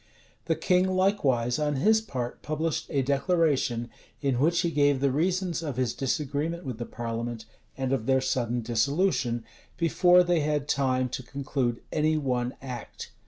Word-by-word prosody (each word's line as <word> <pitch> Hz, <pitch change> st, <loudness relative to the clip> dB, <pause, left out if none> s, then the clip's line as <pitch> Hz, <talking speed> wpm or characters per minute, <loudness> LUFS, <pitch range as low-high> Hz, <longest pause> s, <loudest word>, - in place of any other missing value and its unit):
The 165 Hz, -, +1 dB
king 180 Hz, +3 st, +2 dB
likewise, 140 Hz, -, +1 dB
on 150 Hz, -1 st, 0 dB
his 220 Hz, +10 st, +3 dB
part, 125 Hz, -, -5 dB
published 155 Hz, +1 st, -2 dB
a 140 Hz, -3 st, +1 dB
declaration, 140 Hz, -5 st, +1 dB, 0.3 s
in 135 Hz, -4 st, 0 dB
which 170 Hz, +5 st, +3 dB
he 170 Hz, -, 0 dB
gave 145 Hz, -2 st, +3 dB
the 140 Hz, 0 st, +2 dB
reasons 175 Hz, +3 st, 0 dB
of 145 Hz, -6 st, -4 dB
his 125 Hz, -3 st, 0 dB
disagreement 150 Hz, +5 st, -2 dB
with 125 Hz, -4 st, -5 dB
the 120 Hz, -, -4 dB
parliament, 115 Hz, -1 st, -4 dB, 0.3 s
and 135 Hz, 0 st, -1 dB
of 115 Hz, -4 st, -2 dB
their 130 Hz, 0 st, +4 dB
sudden 125 Hz, -2 st, -1 dB
dissolution, 120 Hz, -, 0 dB, 0.3 s
before 180 Hz, +1 st, +5 dB
they 175 Hz, -1 st, +2 dB
had 150 Hz, -1 st, 0 dB
time 130 Hz, -3 st, +1 dB
to 130 Hz, -, -4 dB
conclude 130 Hz, -3 st, -2 dB
any 155 Hz, 0 st, +2 dB
one 125 Hz, -3 st, -1 dB
act. 125 Hz, -2 st, -7 dB
140 Hz, 160 wpm, -27 LUFS, 125-165 Hz, 0.3 s, before